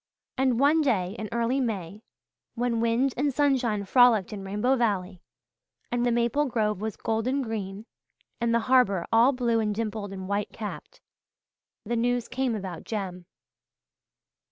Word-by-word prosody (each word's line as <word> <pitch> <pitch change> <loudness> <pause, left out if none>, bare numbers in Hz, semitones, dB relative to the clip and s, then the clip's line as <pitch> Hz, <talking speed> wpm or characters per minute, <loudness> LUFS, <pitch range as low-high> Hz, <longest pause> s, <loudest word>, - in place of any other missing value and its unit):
And 260 -3 +1
one 295 +4 +4
day 205 -9 0
in 215 -1 -5
early 235 +3 0
May, 205 -5 -3 0.5
when 240 -1 0
wind 235 +3 +1
and 285 +2 +1
sunshine 250 -7 +1
frolicked 230 -3 +4
in 200 -2 -6
Rainbow 210 +7 +1
Valley 195 -7 -1 0.7
and 240 0 0
the 245 - +2
maple 240 +5 +1
grove 210 -5 -1
was 220 -1 -4
golden 245 +5 -1
green 210 -2 -5 0.5
and 235 -1 +1
the 235 0 +2
harbour 220 -8 +3
all 230 +4 +5
blue 240 -3 +1
and 210 -2 -1
dimpled 215 -2 -3
and 190 -1 -6
white 200 +1 -2
capped, 215 -2 -8 0.8
the 235 - -1
news 240 0 0
came 255 -2 -1
about 190 -5 -6
Jem. 185 -5 -5
230 Hz, 150 wpm, -27 LUFS, 205-245 Hz, 0.8 s, all